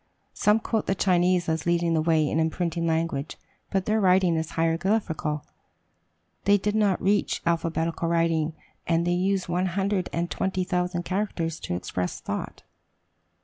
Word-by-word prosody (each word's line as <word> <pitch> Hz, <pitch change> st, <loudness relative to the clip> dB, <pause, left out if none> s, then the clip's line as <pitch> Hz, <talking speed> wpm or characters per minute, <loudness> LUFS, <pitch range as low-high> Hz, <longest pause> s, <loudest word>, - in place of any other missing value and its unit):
Some 210 Hz, +1 st, +3 dB
quote 220 Hz, -1 st, -2 dB
the 195 Hz, -, +1 dB
Chinese 180 Hz, -1 st, +2 dB
as 160 Hz, 0 st, -1 dB
leading 170 Hz, -1 st, +2 dB
the 160 Hz, -, +2 dB
way 160 Hz, -1 st, +2 dB
in 155 Hz, -, 0 dB
imprinting 165 Hz, +1 st, -1 dB
language. 160 Hz, -3 st, -1 dB, 0.3 s
But 190 Hz, -1 st, 0 dB
their 215 Hz, 0 st, +1 dB
writing 185 Hz, -2 st, +4 dB
was 160 Hz, 0 st, -2 dB
hieroglyphical, 165 Hz, -2 st, 0 dB, 1.0 s
they 205 Hz, 0 st, +5 dB
did 205 Hz, +1 st, -1 dB
not 210 Hz, -4 st, +2 dB
reach 205 Hz, +2 st, +1 dB
alphabetical 165 Hz, 0 st, 0 dB
writing, 165 Hz, -2 st, +1 dB, 0.3 s
and 170 Hz, 0 st, +2 dB
they 175 Hz, -, +1 dB
use 190 Hz, +1 st, 0 dB
one 180 Hz, +2 st, 0 dB
hundred 195 Hz, +1 st, -1 dB
and 170 Hz, +1 st, -2 dB
twenty 190 Hz, -1 st, -1 dB
thousand 180 Hz, -1 st, -1 dB
characters 185 Hz, -5 st, -2 dB
to 90 Hz, -, -3 dB
express 90 Hz, 0 st, -3 dB
thought. -, -, -5 dB
175 Hz, 150 wpm, -26 LUFS, 165-190 Hz, 1.0 s, they